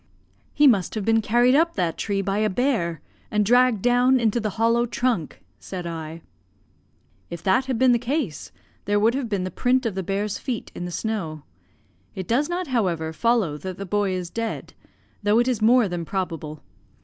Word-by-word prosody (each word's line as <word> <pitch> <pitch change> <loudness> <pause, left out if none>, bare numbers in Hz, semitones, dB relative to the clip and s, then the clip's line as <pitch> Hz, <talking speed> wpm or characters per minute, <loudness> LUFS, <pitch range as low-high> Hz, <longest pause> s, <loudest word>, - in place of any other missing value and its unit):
"He 295 - +3
must 205 - +3
have 210 -3 -3
been 225 0 +3
carried 240 +3 +3
up 330 +4 +3
that 175 -4 0
tree 200 -2 -2
by 195 +2 -1
a 215 0 +2
bear, 185 - 0 0.3
and 210 -1 +1
dragged 245 -2 +3
down 245 +1 +4
into 230 0 +1
the 215 -2 -2
hollow 230 +2 +2
trunk," 235 - -2 0.2
said 180 -2 -7
I. 165 -1 -6 1.1
"If 170 0 -7
that 190 +8 +2
had 260 -3 -1
been 255 +1 +4
the 240 - +3
case, 245 - -3 0.3
there 205 +1 +2
would 225 +3 +3
have 265 -3 -3
been 200 -3 -1
the 185 - -4
print 255 +7 +1
of 225 - -1
the 190 - -3
bear's 195 +3 -2
feet 245 -5 -4
in 175 - -6
the 175 - -5
snow. 170 -8 -3 0.7
It 185 -2 -5
does 280 +7 +1
not, 360 +1 -2
however, 180 - -1
follow 210 -6 +1
that 185 +1 -6
the 200 - -5
boy 205 0 0
is 180 -2 -4
dead, 230 -1 -4 0.5
though 205 +1 +3
it 240 +1 +3
is 245 -4 0
more 235 +1 +5
than 175 -2 -4
probable. 165 -3 -4
210 Hz, 195 wpm, -23 LUFS, 180-245 Hz, 1.1 s, more